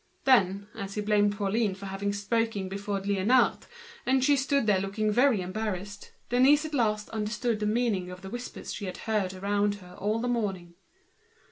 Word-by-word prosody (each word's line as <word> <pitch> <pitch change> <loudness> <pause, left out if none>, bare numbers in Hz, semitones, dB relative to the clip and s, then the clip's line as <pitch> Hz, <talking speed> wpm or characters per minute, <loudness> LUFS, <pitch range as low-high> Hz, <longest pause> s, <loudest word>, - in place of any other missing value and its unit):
Then, 200 -6 +3
as 200 0 -6
he 210 - -1
blamed 205 -1 +2
Pauline 205 0 0
for 200 +1 -9
having 195 +1 -2
spoken 205 0 -1
before 200 +1 -3
Liénard, 205 +6 +2 0.4
and 265 0 +2
she 285 +2 +5
stood 275 -1 +1
there 205 -3 +3
looking 205 +3 -1
very 245 -2 +3
embarrassed, 200 +1 -5 0.2
Denise 275 +5 +5
at 310 - -6
last 215 -5 +1
understood 215 +1 -1
the 210 - -1 0.6
whispered 245 +1 -6
phrases - - -6
she 205 - -5
had 185 - -5
heard 205 -4 0
around 205 +2 0
her 180 -3 -13
all 210 +3 0
the 240 +2 -2
morning. 195 -8 -2
210 Hz, 165 wpm, -28 LUFS, 195-230 Hz, 0.6 s, she